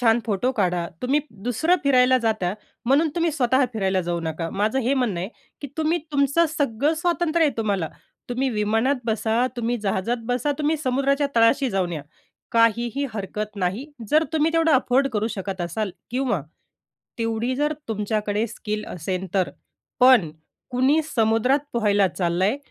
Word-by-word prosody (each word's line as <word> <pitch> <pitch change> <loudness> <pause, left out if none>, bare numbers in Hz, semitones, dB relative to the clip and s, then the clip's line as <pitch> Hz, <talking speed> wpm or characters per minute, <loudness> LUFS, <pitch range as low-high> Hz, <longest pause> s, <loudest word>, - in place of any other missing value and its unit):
छान 230 -1 +4
फोटो 220 +4 +1
काढा. 180 -6 0 0.2
तुम्ही 270 +4 +2 0.2
दुसरं 320 +9 +2
फिरायला 255 -2 +5
जाता 215 -6 0 0.3
म्हणून 280 +6 +3
तुम्ही 335 -1 +1
स्वतः 260 -2 +2
फिरायला 195 -4 0
जाऊ 170 0 -2
नका. 165 0 -3
माझं 215 +6 0
हे 260 +2 +1
म्हणणं 235 -10 0
आहे 185 - -3 0.3
की 285 - -6
तुम्ही 320 +2 +1
तुमचं 280 +4 +3
सगळं 280 +2 +1
स्वातंत्र्य 335 0 +1
आहे 295 - 0
तुम्हाला. 200 -7 -1 0.4
तुम्ही 255 +2 0
विमानात 225 +5 +1
बसा, 225 +2 +1
तुम्ही 240 0 -1
जहाजात 195 +4 0
बसा, 250 +4 0
तुम्ही 305 +1 +1
समुद्राच्या 275 0 +1
तळाशी 240 +4 +4
जाऊन 185 -3 -1
या, 155 -3 -4 0.5
काहीही 235 +3 +2
हरकत 210 +1 -4
नाही. 195 +8 -2 0.2
जर 310 +1 +4
तुम्ही 320 +1 +2
तेवढं 330 0 +3
अफोर्ड 260 0 +3
करू 215 0 0
शकत 195 -1 -4
असाल 180 +4 -2 0.2
किंवा 245 - 0 0.8
तेवढी 230 +2 -1
जर 295 +2 +1 0.2
तुमच्याकडे 210 0 -1
स्किल 210 -1 -5
असेल 185 +2 -4
तर. 190 -2 +1 0.5
पण 250 -10 +6 0.4
कुणी 260 +5 +3
समुद्रात 230 -2 +2
पोहायला 205 -4 +3
चाललंय, 180 +5 0
230 Hz, 150 wpm, -23 LUFS, 205-275 Hz, 0.8 s, पण